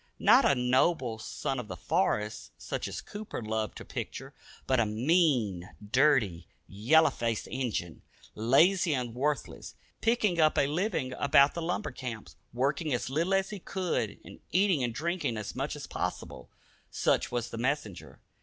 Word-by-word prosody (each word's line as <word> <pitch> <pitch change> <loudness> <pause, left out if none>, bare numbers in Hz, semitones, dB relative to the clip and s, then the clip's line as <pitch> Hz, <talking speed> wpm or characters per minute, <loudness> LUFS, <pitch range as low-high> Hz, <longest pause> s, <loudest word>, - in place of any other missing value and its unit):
Not - - +5
a - - +4
"noble 125 -1 +1
son 135 +3 -3
of 120 - -6
the - - -7
forest," 110 - -1
such - - -4
as - - -5
Cooper 210 0 -7
loved 110 -1 -3
to - - -9
picture, - - -6 0.3
but 130 -1 +2
a 115 - +3
mean, 115 - +1 0.2
dirty, 120 - +3 0.2
yellow 130 +12 +4
faced 115 -2 -2
"Injun." 115 -10 -3 0.3
Lazy 160 - +3
and 125 -3 -3
worthless, 140 +2 -3 0.3
picking 220 -6 +2
up 155 -1 +4
a 140 - +4
living 155 -3 -1
about 140 0 +5
the 170 - -4
lumber 175 +1 -2
camps, 125 -4 -7 0.2
working 140 +5 -1
as 125 - -4
little 170 +7 +1
as 195 +1 0
he 205 - -6
could, 185 0 -2
and - - -12
eating 185 -6 +3
and 120 - 0
drinking 160 -5 -2
as 105 - -6
much - - -3
as - - -7
possible: - - -5 0.4
such - - 0
was 120 -1 -3
the 115 - -5
messenger. 120 -7 -3
135 Hz, 160 wpm, -29 LUFS, 115-170 Hz, 0.4 s, Not